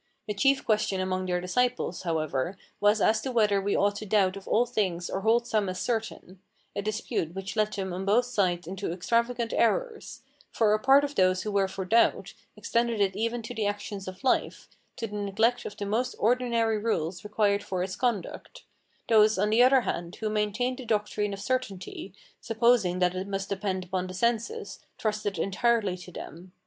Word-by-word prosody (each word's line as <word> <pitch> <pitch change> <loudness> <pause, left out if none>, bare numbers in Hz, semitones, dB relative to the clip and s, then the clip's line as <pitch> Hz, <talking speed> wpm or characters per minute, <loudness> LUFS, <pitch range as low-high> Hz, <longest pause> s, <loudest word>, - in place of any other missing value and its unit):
The 210 - -3
chief 270 +6 +2
question 210 -3 +1
among 185 0 -1
their 180 -1 0
disciples, 245 +1 -1
however, 160 0 -2 0.2
was 205 +1 +3
as 220 0 +3
to 265 - -3
whether 210 -4 +3
we 200 +1 0
ought 205 0 +2
to 215 - -6
doubt 195 -2 +2
of 195 - -10
all 235 +3 +3
things 190 -8 -2
or 195 - -2
hold 230 +3 +3
some 215 -4 0
as 185 - -4
certain, 220 -5 -4 0.3
a 200 - -1
dispute 205 -5 -3
which 195 +2 -5
led 215 -1 +1
them 190 -2 -3
on 185 +2 -4
both 215 +5 +3
sides 185 -8 0
into 190 +1 -4
extravagant 235 +6 0
errors; 455 - 0 0.3
for 215 -2 +2
a 215 - +2
part 270 +4 +5
of 290 0 -2
those 185 -4 +2
who 215 - -3
were 200 -1 +2
for 190 0 -5
doubt, 230 +5 +2 0.2
extended 235 -1 0
it 195 -2 +1
even 230 +2 -2
to 235 - -6
the 215 -3 -1
actions 205 -1 -5
of 185 +5 -8
life, 260 - 0 0.3
to 230 - -4
the 210 -1 -6
neglect 220 +4 +1
of - - -7
the 205 - -4
most 235 +5 -1
ordinary 230 -1 +1
rules 180 -5 -2
required 210 -1 +1
for 185 -2 -3
its 185 0 -4
conduct; 235 -8 -3 0.4
those, 215 -1 +5
on 210 +2 +1
the 225 +3 +5
other 260 +1 +6
hand, 175 -5 -4
who 215 -1 -3
maintained 215 +5 -1
the - - -6
doctrine 210 -1 -1
of 195 - -5
certainty, 200 -5 -3 0.3
supposing 225 -5 +2
that 180 -1 +2
it 185 +1 -4
must 195 0 -3
depend 195 -1 -2
upon 185 0 -2
the 185 - -8
senses, 235 - -1 0.2
trusted 210 -3 -2
entirely 205 +2 +1
to 180 0 -11
them. 180 +2 -10
210 Hz, 195 wpm, -27 LUFS, 190-230 Hz, 0.4 s, other